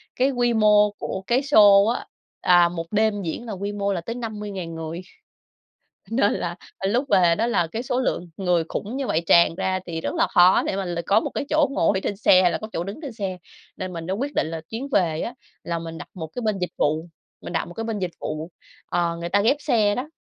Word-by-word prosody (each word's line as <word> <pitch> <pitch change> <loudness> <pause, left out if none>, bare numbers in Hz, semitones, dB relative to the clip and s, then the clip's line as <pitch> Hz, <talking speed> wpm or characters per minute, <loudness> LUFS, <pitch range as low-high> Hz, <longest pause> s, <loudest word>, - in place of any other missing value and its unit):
Cái 265 +2 +2
quy 240 -2 +1
mô 210 -1 +5
của 190 - -5
cái 245 +2 +3
sô 205 -7 +7
á, 235 +2 -1 0.4
à, 175 -1 +5
1 165 -1 -5
đêm 215 -1 +1
diễn 185 +8 -4
là 220 - -5
quy 200 +2 -4
mô 200 -1 -1
là 175 - -3
tới 230 +7 -5
50.000 210 -7 -5
người. 165 +2 -5 1.1
Nên 225 -3 +2
là 175 0 -3 0.3
lúc 240 +7 +1
về 175 -4 +4
đó 230 - 0
là 175 -8 +1
cái 225 +9 -5
số 250 0 -1
lượng 180 -8 -2
người 180 -3 +1
khủng 230 +6 -4
như 275 -2 -2
vậy 160 - +1
tràn 170 0 +5
ra 185 0 -1
thì 165 -2 -5
rất - - -3
là - - +2
khó 180 +1 +5
để - - -2
mà 195 -1 -2
là 175 -1 -3
có 200 +2 +4
một - - -3
cái - - -2
chỗ 305 -2 +3
ngồi 190 -3 +1
trên 200 - -2
xe 185 -3 +5
hay 180 -2 +3
là - - -1
có 215 - -7
chỗ 170 - -2
đứng 200 - -7
trên 275 -6 -6
xe. 195 -4 -4 0.4
Nên 185 -1 -5
mình 165 0 -6
đã 190 - -1
quyết 275 +7 -3
định - - 0
là 160 0 -5
chuyến 240 +5 -5
về 165 -8 +1
á 240 - -4 0.3
là 170 -1 -2
mình 165 0 -7
đặt - - -9
một 160 -4 -6
cái 245 - -3
bên 215 -3 0
dịch 180 - -2
vụ. 155 +3 +1 0.4
Mình - - -7
đặt - - 0
một 175 - -10
cái 225 - -5
bên 225 -2 -3
dịch 180 -2 -2
vụ, 155 +2 -5 0.4
ờ, 170 -1 -1
người 170 0 -4
ta 200 +2 +3
ghép 240 +7 +3
xe 210 -6 +2
đó, 265 +5 -4
195 Hz, 250 wpm, -23 LUFS, 170-225 Hz, 1.1 s, sô